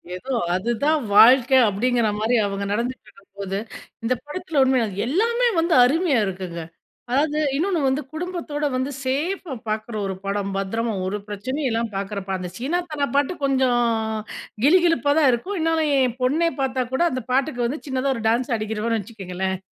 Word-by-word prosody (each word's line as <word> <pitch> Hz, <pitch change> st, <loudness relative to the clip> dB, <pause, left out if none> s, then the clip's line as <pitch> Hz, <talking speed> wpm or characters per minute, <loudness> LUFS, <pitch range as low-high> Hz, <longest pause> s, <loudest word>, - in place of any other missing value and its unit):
எதோ, 260 Hz, +9 st, -5 dB, 0.2 s
அதுதான் 240 Hz, +10 st, +1 dB, 0.2 s
வாழ்க்கை 250 Hz, +4 st, +7 dB
அப்பிடிங்கிறமாரி 220 Hz, +1 st, +1 dB
அவுங்க 200 Hz, 0 st, -3 dB
நடந்துட்டு 240 Hz, +2 st, -3 dB
இருக்கும்போது, 200 Hz, -1 st, -7 dB, 0.5 s
இந்த 235 Hz, +2 st, +2 dB
படத்தில 310 Hz, -1 st, -1 dB
உண்மையா, 260 Hz, -3 st, +2 dB, 0.2 s
எல்லாமே 465 Hz, -, +2 dB
வந்து 335 Hz, +1 st, +1 dB
அருமையா 290 Hz, +1 st, +2 dB
இருக்குங்க. 185 Hz, -3 st, -5 dB, 0.5 s
அதாவது 295 Hz, +3 st, +1 dB, 0.2 s
இன்னொன்னு, 340 Hz, +2 st, 0 dB
வந்து 265 Hz, +3 st, +1 dB
குடும்பத்தோட 325 Hz, -3 st, -3 dB
வந்து 260 Hz, +2 st, -1 dB
சேஃபா 300 Hz, +5 st, -2 dB, 0.2 s
பார்க்குற 215 Hz, +1 st, -3 dB
ஒரு 190 Hz, -1 st, -3 dB
படம். 200 Hz, 0 st, -1 dB
பத்திரமா 225 Hz, +4 st, -2 dB
ஒரு 195 Hz, +2 st, -2 dB
பிரச்சனையும் 260 Hz, +8 st, -3 dB
இல்ல, 225 Hz, 0 st, 0 dB, 0.2 s
பார்க்குறப்ப 200 Hz, -1 st, -4 dB
அந்த 180 Hz, -1 st, -5 dB
சீனா 290 Hz, +9 st, -1 dB
தான 285 Hz, -2 st, -1 dB
பாட்டு 285 Hz, +4 st, +2 dB
கொஞ்சம் 260 Hz, -3 st, +2 dB, 0.9 s
கிளுகிளுப்பா 330 Hz, -1 st, +4 dB
தான் 290 Hz, -4 st, +5 dB
இருக்கும். 365 Hz, +12 st, -2 dB
இருந்தாலும் 325 Hz, 0 st, +1 dB, 0.2 s
என் 240 Hz, 0 st, -6 dB
பொண்ணே 315 Hz, +7 st, +2 dB
பார்த்தா 260 Hz, -1 st, 0 dB
கூட, 265 Hz, -, 0 dB
அந்த 255 Hz, -1 st, -3 dB
பாட்டுக்கு, 260 Hz, -2 st, +1 dB
வந்து 285 Hz, +6 st, -4 dB
சின்னதா 265 Hz, 0 st, 0 dB
ஒரு 230 Hz, -, -6 dB
டான்ஸ் 245 Hz, +3 st, 0 dB
ஆடிக்கிருவான்னு 220 Hz, +1 st, -1 dB
வச்சுக்கோங்களேன்! 190 Hz, -3 st, -4 dB
255 Hz, 150 wpm, -23 LUFS, 215-295 Hz, 0.9 s, வாழ்க்கை